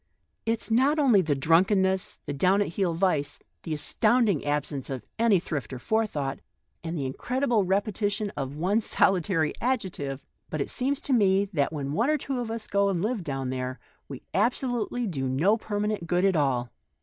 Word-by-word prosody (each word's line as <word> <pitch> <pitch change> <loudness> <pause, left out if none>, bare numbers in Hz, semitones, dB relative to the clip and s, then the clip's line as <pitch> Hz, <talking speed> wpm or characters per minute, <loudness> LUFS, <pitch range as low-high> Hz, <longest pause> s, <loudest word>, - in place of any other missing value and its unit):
It's 225 0 -1
not 270 +7 +3
only 255 -10 +5
the 155 -5 0
drunkenness, 190 +6 +2
the 145 - -3
down 185 +8 +3
at - - -5
heel 175 -1 -1
vice, 160 -6 0 0.2
the 160 - -4
as 150 - 0
tounding 220 - +3
absence 145 -2 -2
of 130 -5 -5
any 225 -5 +4
thrift 150 -5 -4
or 130 - -5
forethought, 150 - -1 0.4
and 165 0 -4
the 140 - -2
incredible 240 - 0
repetition 205 +2 0
of 135 0 -4
one 190 +8 +1
solitary 180 -6 +2
adjective; 185 - -2 0.2
but 155 - -3
it 140 - -2
seems 275 +2 -1
to 275 - -1
me 200 -4 +4
that 145 -3 +1
when 145 -2 -4
one 230 - +1
or 305 - +3
two 270 -2 -3
of 240 -2 -3
us 225 -1 -4
go 200 0 +2
and 180 -2 -1
live 220 -3 -1
down 135 -4 -3
there 130 0 -3 0.3
we 135 -3 -9
ab 225 +6 +3
solutely 245 -1 -2
do 135 -8 -2
no 165 +12 +3
permanent 210 -4 -2
good 180 +3 +2
at 195 -2 +3
all. 130 -5 +1
190 Hz, 185 wpm, -27 LUFS, 145-220 Hz, 0.4 s, only